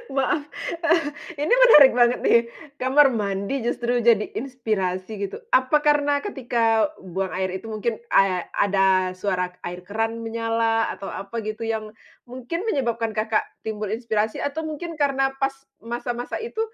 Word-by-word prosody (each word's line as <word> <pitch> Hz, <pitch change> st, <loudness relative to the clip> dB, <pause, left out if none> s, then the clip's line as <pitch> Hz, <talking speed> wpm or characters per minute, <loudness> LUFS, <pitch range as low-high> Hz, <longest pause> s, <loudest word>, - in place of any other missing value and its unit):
Maaf, 275 Hz, +2 st, 0 dB, 1.0 s
ini 295 Hz, -, 0 dB
menarik 300 Hz, -, +8 dB
banget 240 Hz, 0 st, +4 dB
nih. -, -, +5 dB, 0.4 s
Kamar 270 Hz, +2 st, +5 dB
mandi 210 Hz, +2 st, -2 dB
justru 240 Hz, 0 st, 0 dB
jadi 225 Hz, -3 st, +4 dB
inspirasi, 215 Hz, -5 st, -3 dB
gitu? 435 Hz, -, -6 dB
Apa, 260 Hz, -, +3 dB
karena 290 Hz, -1 st, +2 dB
ketika 240 Hz, -, 0 dB
buang 190 Hz, +1 st, -4 dB
air 190 Hz, +1 st, -1 dB
itu 190 Hz, -, -10 dB
mungkin, 220 Hz, +1 st, -2 dB, 0.2 s
ad 185 Hz, -2 st, +3 dB
ada 190 Hz, -2 st, +2 dB
suara 185 Hz, -1 st, -1 dB, 0.2 s
air 175 Hz, +1 st, -5 dB
keran 225 Hz, +2 st, -2 dB
menyala 225 Hz, 0 st, 0 dB
atau, 195 Hz, -, -8 dB
apa, 215 Hz, +4 st, -5 dB
gitu, 215 Hz, +1 st, -5 dB
yang 220 Hz, -1 st, -4 dB, 0.3 s
mungkin 255 Hz, +7 st, -5 dB
menyebabkan 235 Hz, -, -1 dB
Kakak 215 Hz, 0 st, +1 dB, 0.2 s
timbul 215 Hz, -1 st, -3 dB
inspirasi, 220 Hz, 0 st, -1 dB
atau, 285 Hz, +3 st, -3 dB
mungkin 315 Hz, +1 st, -6 dB
karena 270 Hz, -1 st, +2 dB
pas 270 Hz, 0 st, 0 dB, 0.2 s
masa-masa 240 Hz, +1 st, -4 dB
itu, 455 Hz, -1 st, -5 dB
230 Hz, 140 wpm, -23 LUFS, 210-270 Hz, 1.0 s, menarik